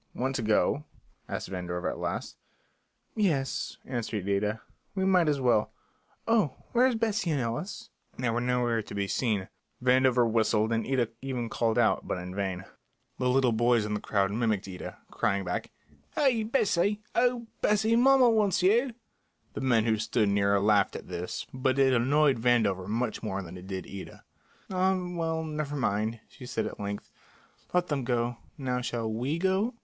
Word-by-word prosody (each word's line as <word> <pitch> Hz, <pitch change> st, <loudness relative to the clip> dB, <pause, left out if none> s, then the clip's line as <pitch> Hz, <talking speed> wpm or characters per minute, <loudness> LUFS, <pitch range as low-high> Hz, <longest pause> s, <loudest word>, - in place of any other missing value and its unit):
"Want 130 Hz, +2 st, -1 dB
to -, -, -2 dB
go?" 115 Hz, +7 st, +2 dB, 0.4 s
asked -, -, -4 dB
Vandover 90 Hz, -1 st, -3 dB
at -, -, -3 dB
last. -, -, -3 dB, 0.8 s
"Yes," 155 Hz, -11 st, 0 dB
answered 110 Hz, -6 st, -3 dB
Ida, 105 Hz, +2 st, 0 dB, 0.4 s
"we 190 Hz, -1 st, 0 dB
might 180 Hz, -4 st, +4 dB
as 145 Hz, -2 st, +1 dB
well. 120 Hz, -5 st, +3 dB, 0.6 s
Oh, 220 Hz, -, +2 dB, 0.2 s
where's 250 Hz, +1 st, +4 dB
Bessie 220 Hz, -5 st, 0 dB
and 150 Hz, -3 st, +1 dB
Ellis?" 155 Hz, -, -4 dB, 0.3 s
They 125 Hz, -2 st, 0 dB
were 120 Hz, +1 st, 0 dB
nowhere 120 Hz, -2 st, +1 dB
to 105 Hz, -, -9 dB
be 100 Hz, -1 st, -1 dB
seen. 105 Hz, -3 st, 0 dB, 0.3 s
Vandover 125 Hz, -1 st, +4 dB
whistled 110 Hz, -1 st, +2 dB
and 115 Hz, -, -1 dB
Ida 125 Hz, -4 st, +1 dB
even 125 Hz, -3 st, -3 dB
called, 115 Hz, -1 st, 0 dB
but -, -, +2 dB
in 90 Hz, +1 st, -6 dB
vain. 95 Hz, -1 st, -3 dB, 0.5 s
The 125 Hz, -1 st, +1 dB
little 130 Hz, -1 st, +3 dB
boys 120 Hz, 0 st, +3 dB
in 105 Hz, -, -2 dB
the 105 Hz, -, -1 dB
crowd 100 Hz, -2 st, 0 dB
mimicked 110 Hz, -3 st, 0 dB
Ida, 90 Hz, -2 st, -7 dB
crying 100 Hz, 0 st, 0 dB
back, -, -, -3 dB, 0.5 s
"Hey! 255 Hz, -6 st, +3 dB
Bessie! 210 Hz, -3 st, +1 dB
Oh, 245 Hz, -1 st, +2 dB, 0.2 s
Bes 210 Hz, -1 st, +3 dB
see, 220 Hz, +1 st, +3 dB
mommer 255 Hz, 0 st, +6 dB
wants 210 Hz, -4 st, +2 dB
you!" 235 Hz, +7 st, +3 dB, 0.6 s
The -, -, -5 dB
men 120 Hz, -4 st, +3 dB
who 110 Hz, -1 st, +2 dB
stood 110 Hz, -1 st, +1 dB
near 100 Hz, 0 st, +3 dB
laughed 100 Hz, -1 st, +3 dB
at -, -, -8 dB
this, 90 Hz, +1 st, -4 dB
but 130 Hz, 0 st, 0 dB
it 135 Hz, -1 st, +4 dB
annoyed 135 Hz, +2 st, +3 dB
Vandover 110 Hz, -6 st, +2 dB
much 115 Hz, +1 st, -2 dB
more 100 Hz, -3 st, -3 dB
than 90 Hz, +1 st, -9 dB
it 90 Hz, +1 st, -10 dB
did 95 Hz, -1 st, -4 dB
Ida. 100 Hz, -1 st, -9 dB, 0.5 s
"Ah, 190 Hz, 0 st, +2 dB
well, 165 Hz, -2 st, -1 dB
never 150 Hz, -2 st, -3 dB
mind," 110 Hz, -3 st, -1 dB
she 125 Hz, -2 st, -12 dB
said 125 Hz, -, -2 dB
at -, -, -6 dB
length. 100 Hz, 0 st, -5 dB, 0.6 s
"Let 180 Hz, 0 st, +1 dB
them 140 Hz, -3 st, -1 dB
go. 120 Hz, 0 st, 0 dB, 0.2 s
Now 125 Hz, -3 st, -1 dB
shall 120 Hz, -2 st, -2 dB
we 125 Hz, +8 st, -1 dB
go?" 190 Hz, +6 st, +1 dB
125 Hz, 170 wpm, -28 LUFS, 105-165 Hz, 0.8 s, mommer